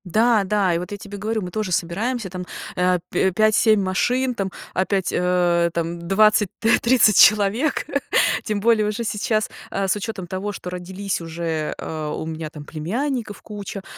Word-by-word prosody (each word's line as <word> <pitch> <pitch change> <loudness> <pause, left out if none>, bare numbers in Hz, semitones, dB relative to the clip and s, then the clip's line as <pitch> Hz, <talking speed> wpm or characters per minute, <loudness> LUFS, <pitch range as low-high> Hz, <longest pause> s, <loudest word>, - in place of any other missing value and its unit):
Да, 220 +3 +3
да. 195 -2 +1
И 170 - 0
вот 180 - -7
я 205 - -4
тебе 205 0 -9
говорю, 215 +2 -2
мы 180 - -6
тоже 210 -1 -3
собираемся 200 +6 -1
там, 180 0 -6 0.3
э, 180 0 +2
п 190 - +1
пять-семь 215 +1 +4
машин, 250 +7 +1
там 195 -4 -2 0.2
опять, 190 0 0
э, 175 -1 +2
там 170 0 -3
20 210 +1 +4
т 225 +1 +3
30 235 -4 +4
человек. 215 +8 +4 0.6
Тем 210 -2 -2
более 220 -1 +3
уже 215 +3 -2
сейчас, 215 0 -1 0.2
э, 195 - -1
с 190 - +2
учётом 205 -2 -5
того, 190 +3 -4
что 180 - -7
родились 185 +1 -4
уже, 165 -2 -3
э, 155 -1 -5
у - - -5
меня 160 -1 -5
там 150 -1 -10
племянников 215 - -3
куча, 205 -2 -7
195 Hz, 170 wpm, -22 LUFS, 180-215 Hz, 0.6 s, пять-семь